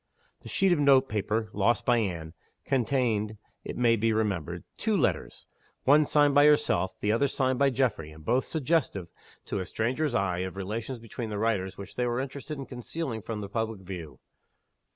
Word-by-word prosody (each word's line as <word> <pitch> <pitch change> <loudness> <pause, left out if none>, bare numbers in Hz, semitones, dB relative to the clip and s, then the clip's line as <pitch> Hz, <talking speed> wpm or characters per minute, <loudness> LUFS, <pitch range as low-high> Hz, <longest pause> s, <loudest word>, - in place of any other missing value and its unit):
The - - -11
sheet 195 -1 +2
of 175 - +3
note 135 -2 +5
paper, 105 0 -1
lost 120 +4 +2
by 120 -1 +4
Anne, 85 -7 -3 0.3
contained, 115 -5 0 0.3
it - - -6
may 120 -2 +4
be 115 +1 +1
remembered, 90 -6 -1
two 215 -2 0
letters 145 - -1 0.4
one 145 +2 +5
signed 145 -1 +4
by 145 +1 +7
herself; 145 -10 +2
the 105 - +2
other 115 +6 +3
signed 130 -2 0
by 140 0 +5
Geoffrey 115 - 0
and 75 0 -14
both 125 +6 +2
suggestive, 145 - 0 0.4
to - - -3
a 95 - -3
stranger's 130 +4 -1
eye, 90 -2 +1
of 95 0 -4
relations 110 +6 -4
between 115 0 -6
the 105 - -3
writers 100 -4 0
which 100 - -9
they 125 0 +1
were 120 +1 0
interested 140 +3 -5
in 135 - -6
concealing 125 -1 -5
from 110 0 -5
the 100 - -5
public 110 -1 -3
view. 85 -7 -8
115 Hz, 185 wpm, -28 LUFS, 100-135 Hz, 0.4 s, by